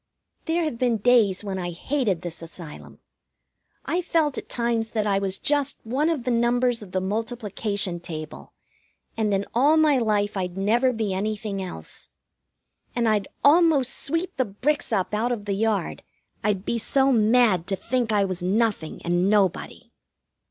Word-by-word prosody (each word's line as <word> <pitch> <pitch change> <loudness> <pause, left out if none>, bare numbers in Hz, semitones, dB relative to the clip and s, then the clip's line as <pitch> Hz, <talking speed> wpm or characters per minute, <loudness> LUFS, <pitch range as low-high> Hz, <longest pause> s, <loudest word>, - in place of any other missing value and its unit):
There 335 +1 0
have 300 -7 -3
been 245 -3 +2
days 215 -4 +3
when 195 -2 -4
I 175 -1 -3
hated 195 - -1
this 175 -1 -5
Asylum. 165 -1 -10 0.9
I've 355 +1 -1
felt 315 -5 +1
at - - -7
times 235 -2 -1
that 215 - +1
I 200 -1 +2
was 195 -1 -1
just 285 +2 +1
one 270 +8 0
of 310 -7 -1
the 250 - -1
numbers 240 0 +1
of 200 -3 -11
the 185 - 0
multiplication 205 -2 -2
table, 155 -3 -8 0.6
and 220 -2 0
in 195 0 0
all 285 +6 +4
my 305 -4 +4
life 210 -3 0
I'd 180 -1 -3
never 235 +6 +2
be 220 -5 -2
anything 205 0 -3
else. 80 - -8 0.9
And 235 -1 +1
I'd 210 -3 +1 0.2
almost 290 -4 +5
sweep 330 +5 -2
the 260 - +2
bricks 255 +10 -1
up 195 -2 0
out 225 +4 0
of 215 -4 -3
the 200 - -1
yard, 205 -2 -1 0.4
I'd 205 -2 0
be 235 - -1
so 270 +4 +2
mad 220 -6 +3
to 195 - 0
think 240 +3 -1
I 205 -2 +3
was 185 -2 -3
nothing 200 -3 -1
and 175 +2 +2
nobody. 200 -4 0
215 Hz, 165 wpm, -24 LUFS, 195-250 Hz, 0.9 s, almost